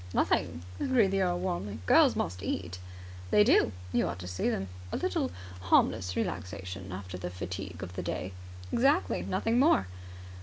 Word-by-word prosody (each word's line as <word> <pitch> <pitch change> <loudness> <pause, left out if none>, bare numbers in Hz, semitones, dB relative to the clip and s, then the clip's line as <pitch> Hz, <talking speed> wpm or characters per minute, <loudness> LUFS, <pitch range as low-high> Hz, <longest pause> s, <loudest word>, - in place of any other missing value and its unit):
"Nothing!" 85 0 +1 0.2
agreed 230 -7 +3
the 195 0 +1
earl 175 -1 +1
warmly. 175 - -3
"Girls - - +6
must 90 +2 -2
eat!" 90 -2 -3 0.5
"They 210 - +6
do. 110 - +4 0.2
You - - +2
ought - - -4
to 90 -1 -7
see 90 +1 -1
them." 95 - -2 0.2
"A - - -1
little - - 0 0.3
harmless 90 0 +2
relaxation 95 +2 -4
after 90 -1 -6
the 90 - -4
fatigue 90 0 -6
of 90 -1 -7
the 90 - -3
day!" 90 +1 -4 0.4
"Exactly. 280 +8 +2
Nothing 230 +2 +1
more." 285 - +5
95 Hz, 160 wpm, -30 LUFS, -, 0.5 s, Girls